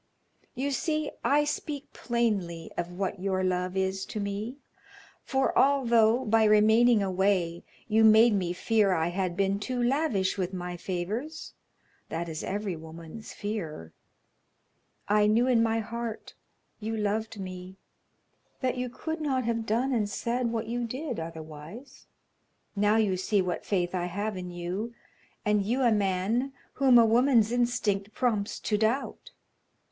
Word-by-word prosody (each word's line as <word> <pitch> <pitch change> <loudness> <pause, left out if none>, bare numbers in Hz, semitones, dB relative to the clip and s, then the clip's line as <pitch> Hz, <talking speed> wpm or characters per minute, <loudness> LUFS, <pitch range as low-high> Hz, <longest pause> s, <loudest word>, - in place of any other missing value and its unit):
You 275 +3 -1
see 305 +1 -1
I 295 +1 +4
speak 295 -1 -4
plainly 200 -9 -1
of 175 +1 -4
what 195 0 -2
your 190 0 -1
love 185 0 -1
is 190 0 0
to 215 - -5
me, 205 +5 -4 0.7
for 265 0 0
although, 240 -3 +4
by 225 +1 +4
remaining 220 +1 +5
away, 185 -3 0 0.2
you 220 0 +3
made 220 +1 +7
me 185 -4 0
fear 205 +2 +2
I 165 -1 +1
had 180 -1 -2
been 195 0 +1
too 250 +4 -3
lavish 240 -8 +1
with 185 0 -2
my 180 0 -4
favors 200 - -4 0.6
that 170 +1 -3
is 160 -2 -5
every 200 -2 -2
woman's 160 +6 -10
fear 160 - -5 1.1
I 210 0 +4
knew 225 +3 +3
in 250 -3 +3
my 225 0 +2
heart 235 0 -6 0.5
you 220 +1 -3
loved 215 +1 -2
me; 185 0 -7 0.8
that 255 -1 -1
you 250 0 -2
could 320 +6 -5
not 265 -4 0
have 230 -1 -2
done 245 +5 +1
and 215 -4 0
said 235 +4 -1
what 225 -1 -2
you 240 +1 -2
did 255 - -4
otherwise. 160 - -9 0.7
Now 205 +1 +3
you 210 -4 +2
see 200 +3 +1
what 180 -2 -2
faith 180 -3 0
I 180 -1 -1
have 200 +4 -3
in 180 -1 -6
you, 180 +7 -4 0.5
and 210 -1 +2
you 245 +6 0
a 240 - +4
man, 210 +6 0 0.2
whom 265 -3 +5
a 230 - +7
woman's 230 -1 +4
instinct 220 -4 0
prompts 220 -5 0
to 210 -1 0
doubt. 225 +5 -1
210 Hz, 150 wpm, -28 LUFS, 185-235 Hz, 1.1 s, made